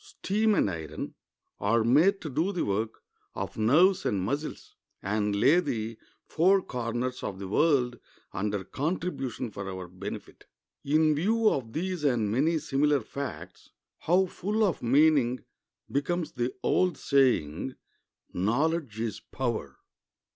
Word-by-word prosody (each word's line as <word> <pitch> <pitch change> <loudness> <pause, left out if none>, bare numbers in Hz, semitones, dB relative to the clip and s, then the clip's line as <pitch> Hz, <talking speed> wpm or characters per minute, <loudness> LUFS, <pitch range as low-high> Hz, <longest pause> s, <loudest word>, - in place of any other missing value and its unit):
Steam 215 - 0
and - - +3
iron 80 -4 -5 0.5
are 115 +3 +2
made 155 - +4
to 160 - -5
do 160 +9 0
the 180 - -1
work 110 +3 -2 0.3
of - - -4
nerves 160 - +4
and 100 - 0
muscles, 140 +11 -4 0.3
and 105 +1 0
lay 135 +12 +5
the 115 -8 -3 0.3
four 185 +4 +3
corners 125 +1 -3
of 95 - -4
the 95 0 -6
world 125 - +2 0.3
under 100 0 -2
contribution 140 - -3
for 100 -1 -6
our 95 -1 -6
benefit. 90 +1 -8 0.4
In 155 +2 +3
view 220 +9 +2
of 115 -5 -3
these 180 0 -3
and 120 -7 +1
many 155 +8 +2
similar 145 -1 +1
facts, 140 +5 -7 0.3
how 180 +3 +3
full 210 +4 -1
of 190 -6 +1
meaning 130 -1 +3 0.5
becomes 165 +4 -1
the 120 0 -2
old 180 -4 +2
saying, 130 - +1 0.6
"Knowledge 125 - 0
is 115 -1 -3
power!" 115 - -4
135 Hz, 135 wpm, -28 LUFS, 110-165 Hz, 0.6 s, lay